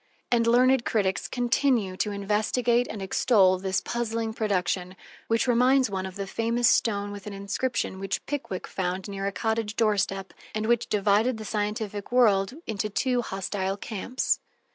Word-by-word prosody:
And 230 Hz, -1 st, +3 dB
learned 250 Hz, +1 st, +4 dB
critics 195 Hz, -5 st, 0 dB
continue 240 Hz, -5 st, +1 dB
to 210 Hz, -, 0 dB
investigate 215 Hz, +4 st, +1 dB
and 205 Hz, -3 st, -5 dB
extol 190 Hz, -2 st, +3 dB
this 190 Hz, 0 st, 0 dB
puzzling 230 Hz, -1 st, -2 dB
production, 185 Hz, -4 st, -1 dB, 0.3 s
which 230 Hz, 0 st, +2 dB
reminds 250 Hz, 0 st, +4 dB
one 190 Hz, -1 st, -2 dB
of 185 Hz, -, -10 dB
the 200 Hz, -1 st, -4 dB
famous 230 Hz, +4 st, +1 dB
stone 205 Hz, -3 st, +2 dB
with 205 Hz, 0 st, -8 dB
an 205 Hz, -, -5 dB
inscription 200 Hz, +1 st, -2 dB
which 195 Hz, 0 st, -3 dB
Pickwick 270 Hz, -10 st, -4 dB
found 185 Hz, +1 st, -3 dB
near 195 Hz, -1 st, -3 dB
a -, -, -1 dB
cottage 220 Hz, +1 st, -2 dB
doorstep, 195 Hz, -3 st, 0 dB, 0.2 s
and 215 Hz, 0 st, -1 dB
which 235 Hz, 0 st, +2 dB
divided 210 Hz, +4 st, +2 dB
the 220 Hz, -, -7 dB
scientific 210 Hz, 0 st, -3 dB
world 215 Hz, -3 st, +3 dB
into 215 Hz, -1 st, -2 dB
two 250 Hz, +4 st, +1 dB
hostile 195 Hz, -2 st, -3 dB
camps. 225 Hz, +5 st, -1 dB
210 Hz, 155 wpm, -26 LUFS, 195-235 Hz, 0.3 s, learned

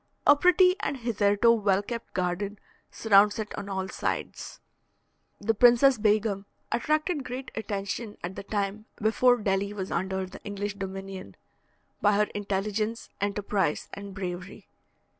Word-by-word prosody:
A 290 Hz, -, +8 dB
pretty 360 Hz, +4 st, +5 dB
and 280 Hz, -, -2 dB
hitherto 220 Hz, -2 st, +3 dB
well 205 Hz, -3 st, +2 dB
kept 235 Hz, +2 st, -7 dB
garden 185 Hz, +3 st, -1 dB, 0.3 s
surrounds 205 Hz, -1 st, +4 dB
it 215 Hz, -1 st, -4 dB
on 200 Hz, -, -6 dB
all 190 Hz, -1 st, -2 dB
sides. -, -, -4 dB, 0.8 s
The 220 Hz, +2 st, +1 dB
Princess 245 Hz, +3 st, +6 dB
Begum 210 Hz, -2 st, +1 dB, 0.2 s
attracted 305 Hz, +4 st, 0 dB
great 255 Hz, +1 st, -6 dB
attention 205 Hz, 0 st, -4 dB
at 180 Hz, +2 st, -5 dB
the -, -, -5 dB
time 200 Hz, +1 st, -3 dB
before 245 Hz, +3 st, +4 dB
Delhi 200 Hz, -1 st, -1 dB
was 195 Hz, -2 st, -5 dB
under 190 Hz, +2 st, -1 dB
the 185 Hz, -, -11 dB
English 205 Hz, 0 st, -4 dB
dominion, 195 Hz, -, -7 dB, 0.7 s
by 205 Hz, -, +4 dB
her 210 Hz, +1 st, +3 dB
intelligence, 210 Hz, +3 st, -2 dB
enterprise, 200 Hz, -4 st, -1 dB
and 200 Hz, -1 st, -8 dB
bravery. 180 Hz, -1 st, -6 dB
205 Hz, 135 wpm, -27 LUFS, 195-225 Hz, 0.8 s, A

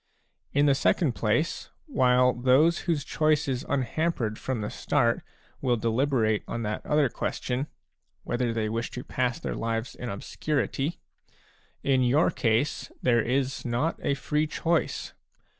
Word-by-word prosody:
In 145 Hz, +1 st, +3 dB
the 140 Hz, -, +5 dB
second 145 Hz, +2 st, +2 dB
place, 120 Hz, +11 st, 0 dB, 0.2 s
while 125 Hz, -, +3 dB
those 130 Hz, +7 st, +4 dB
whose 155 Hz, -4 st, +1 dB
choice 155 Hz, -1 st, +2 dB
is 130 Hz, -2 st, -1 dB
unhampered 130 Hz, -4 st, -1 dB
from 130 Hz, -4 st, -2 dB
the 105 Hz, -, -3 dB
start 120 Hz, -5 st, +1 dB, 0.4 s
will 125 Hz, -2 st, +2 dB
deliberate 115 Hz, -1 st, +1 dB
on 115 Hz, 0 st, -3 dB
that 105 Hz, 0 st, -3 dB
other 150 Hz, -1 st, +3 dB
question, 125 Hz, +3 st, -3 dB, 0.6 s
whether 120 Hz, -1 st, -1 dB
they 110 Hz, -1 st, -1 dB
wish 115 Hz, +2 st, -2 dB
to 125 Hz, -, -4 dB
pass 125 Hz, -1 st, -1 dB
their -, -, -3 dB
lives 115 Hz, +1 st, -2 dB
in 125 Hz, -, -6 dB
obscurity, 135 Hz, -, -2 dB, 0.9 s
in 135 Hz, -2 st, +3 dB
your 130 Hz, +6 st, +3 dB
case 115 Hz, +5 st, 0 dB
there 120 Hz, -2 st, +4 dB
is 130 Hz, +3 st, -1 dB
not 125 Hz, +7 st, -1 dB
a 140 Hz, -, +1 dB
free 150 Hz, +3 st, 0 dB
choice. 165 Hz, +2 st, -1 dB
125 Hz, 140 wpm, -27 LUFS, 115-145 Hz, 0.9 s, the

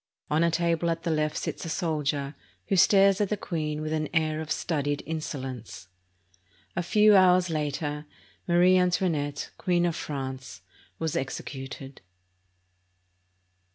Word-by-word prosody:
On 155 Hz, +2 st, +3 dB
a 170 Hz, -, +4 dB
table 170 Hz, 0 st, +1 dB
at 165 Hz, 0 st, -2 dB
the 170 Hz, -, 0 dB
left 155 Hz, -1 st, 0 dB
sits -, -, -4 dB
a 165 Hz, -, -5 dB
soldier, 150 Hz, -4 st, -1 dB, 0.4 s
who 195 Hz, -, +3 dB
stares 195 Hz, +1 st, +5 dB
at 205 Hz, -, +1 dB
the 210 Hz, -, -1 dB
queen 155 Hz, -4 st, -3 dB
with 155 Hz, 0 st, -3 dB
an 155 Hz, -1 st, -1 dB
air 155 Hz, -1 st, +1 dB
of 155 Hz, -, -7 dB
studied 145 Hz, -3 st, -1 dB
insolence. 130 Hz, -10 st, -6 dB, 0.9 s
A 175 Hz, -, 0 dB
few 210 Hz, +4 st, +5 dB
hours 185 Hz, -2 st, +5 dB
later, 150 Hz, 0 st, -3 dB, 0.4 s
Marie 180 Hz, +1 st, +5 dB
Antoinette, 165 Hz, -5 st, 0 dB
Queen 175 Hz, -1 st, +2 dB
of 170 Hz, -2 st, 0 dB
France, 130 Hz, -3 st, -6 dB, 0.4 s
was 160 Hz, 0 st, -2 dB
executed. 135 Hz, -1 st, -6 dB
160 Hz, 135 wpm, -27 LUFS, 145-175 Hz, 0.9 s, stares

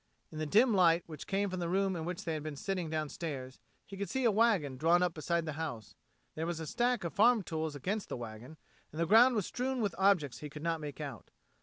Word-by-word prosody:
In 155 Hz, -, -7 dB
the 155 Hz, -, -2 dB
dim 225 Hz, -, +4 dB
light 175 Hz, -3 st, +4 dB
which 155 Hz, -3 st, -9 dB
came 200 Hz, 0 st, 0 dB
from 185 Hz, -, -3 dB
the 170 Hz, -1 st, -2 dB
room 190 Hz, +1 st, +1 dB
in 160 Hz, -2 st, -4 dB
which 180 Hz, 0 st, -4 dB
they 165 Hz, -, -2 dB
had 155 Hz, -, -3 dB
been 155 Hz, -1 st, -5 dB
sitting 180 Hz, +2 st, -3 dB
downstairs 150 Hz, -4 st, -4 dB, 0.3 s
he 195 Hz, -, -9 dB
could 200 Hz, +1 st, -4 dB
see 265 Hz, -1 st, -1 dB
a 235 Hz, -, +5 dB
wagon 205 Hz, -, +2 dB
drawn 165 Hz, +6 st, +3 dB
up 180 Hz, -2 st, 0 dB
beside 165 Hz, +2 st, -1 dB
the 155 Hz, -, -3 dB
house; 120 Hz, -10 st, -5 dB, 0.4 s
there 160 Hz, +1 st, -3 dB
was 170 Hz, -2 st, -3 dB
a 160 Hz, -, -4 dB
stack 240 Hz, -, 0 dB
of 170 Hz, -, -4 dB
farm 225 Hz, +1 st, +4 dB
tools 160 Hz, -2 st, -3 dB
against 195 Hz, +9 st, -3 dB
the -, -, -4 dB
wagon, 120 Hz, +6 st, -9 dB, 0.3 s
and 155 Hz, -, -8 dB
the 170 Hz, -, +2 dB
ground 235 Hz, +7 st, +6 dB
was 210 Hz, -5 st, 0 dB
strewn 260 Hz, +1 st, -2 dB
with 210 Hz, -4 st, 0 dB
objects 185 Hz, -9 st, +3 dB
he 150 Hz, -, -7 dB
could 150 Hz, +1 st, -9 dB
not 165 Hz, -1 st, -1 dB
make 145 Hz, -1 st, -7 dB
out. 140 Hz, -7 st, -7 dB
170 Hz, 250 wpm, -32 LUFS, 155-200 Hz, 0.4 s, ground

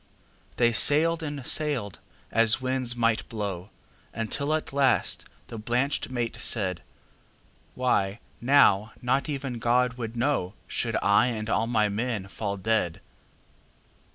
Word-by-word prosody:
'"They 120 Hz, -1 st, +3 dB
sailed 165 Hz, +7 st, +3 dB
and 145 Hz, -4 st, -5 dB
sailed, 135 Hz, -, 0 dB, 0.3 s
as 115 Hz, 0 st, +3 dB
winds 130 Hz, -2 st, -1 dB
might 115 Hz, -2 st, 0 dB
blow, 100 Hz, -4 st, -4 dB, 0.5 s
Until 140 Hz, +6 st, -1 dB
at 155 Hz, -, -4 dB
last 135 Hz, -2 st, +1 dB, 0.2 s
the 115 Hz, -, -8 dB
blanched 125 Hz, +7 st, -1 dB
mate 120 Hz, -2 st, -3 dB
said:"Why, 100 Hz, +2 st, -3 dB, 0.2 s
now 120 Hz, -6 st, +4 dB
not 130 Hz, +5 st, 0 dB
even 135 Hz, -4 st, -4 dB
God 125 Hz, +2 st, +1 dB
would 115 Hz, -1 st, -4 dB
knowShould 120 Hz, -6 st, -2 dB
I 100 Hz, +4 st, +4 dB
and 110 Hz, -2 st, -3 dB
all 115 Hz, -, +1 dB
my 110 Hz, -3 st, +2 dB
men 105 Hz, -1 st, -2 dB
fall 100 Hz, -2 st, -4 dB
dead. 95 Hz, -4 st, 0 dB
120 Hz, 120 wpm, -26 LUFS, 105-130 Hz, 0.5 s, now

